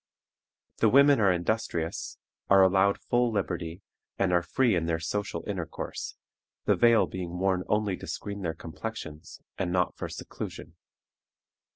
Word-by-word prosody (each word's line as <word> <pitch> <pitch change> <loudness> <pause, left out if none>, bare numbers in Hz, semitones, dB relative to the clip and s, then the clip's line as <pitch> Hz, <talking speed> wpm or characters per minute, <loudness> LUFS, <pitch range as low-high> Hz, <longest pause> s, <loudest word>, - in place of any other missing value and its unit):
The 110 - +4
women 140 +2 +6
are 100 -2 +5
industrious, 85 -2 -2 0.3
are 100 -1 +7
allowed 95 +1 +4
full 120 -1 +1
liberty, 90 -3 -3 0.3
and 95 -2 +1
are 85 - +4
free 120 +6 +2
in 85 -2 0
their 85 -1 +1
social 85 +1 -3
intercourse, 90 -6 -5 0.5
the - - +4
veil 115 -1 +5
being 90 -1 -5
worn 95 0 +1
only 105 -2 +1
to - - -9
screen 100 0 -5
their 80 -3 -2
complexions, 80 -2 -7 0.2
and 90 -2 -1
not 90 0 +1
for - - -5
seclusion. - - -7
95 Hz, 145 wpm, -28 LUFS, 85-105 Hz, 0.5 s, are